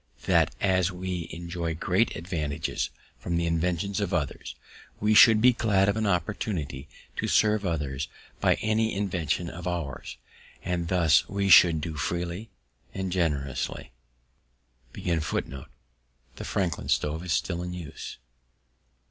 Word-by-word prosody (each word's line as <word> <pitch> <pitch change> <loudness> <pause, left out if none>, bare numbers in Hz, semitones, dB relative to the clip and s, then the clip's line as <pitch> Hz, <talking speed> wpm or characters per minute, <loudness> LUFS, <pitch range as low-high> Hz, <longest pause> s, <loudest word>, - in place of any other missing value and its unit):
_That, - - +4
as 95 -1 +2
we 90 -2 -4
enjoy 85 -1 -4
great 90 +7 +1
advantages 80 -3 -3 0.3
from 85 +7 -2
the 85 - 0
inventions 85 +4 0
of 100 -4 -1
others, 75 -4 -3 0.4
we 105 +1 +2
should 110 0 +8
be 125 +1 +6
glad 100 -4 +2
of 100 - +2
an 110 -1 0
opportunity 85 -6 -2 0.3
to - - -1
serve 105 -2 +3
others 70 -5 -2 0.3
by - - +3
any 110 0 +1
invention 90 -3 -1
of 85 +1 -7
ours; 85 -6 -4 0.5
and 85 -2 -2
this 85 -4 +3
we 100 0 0
should 85 -3 +7
do 80 0 -5
freely 85 +7 -3 0.5
and 95 -1 -3
generously._ 75 -7 -2 1.0
The 65 -6 -5
Franklin 80 -8 -2
stove 75 +2 0
is 90 -3 -1
still 85 0 -1
in 90 0 -5
use. 85 -3 -8
85 Hz, 130 wpm, -27 LUFS, 80-95 Hz, 1.0 s, should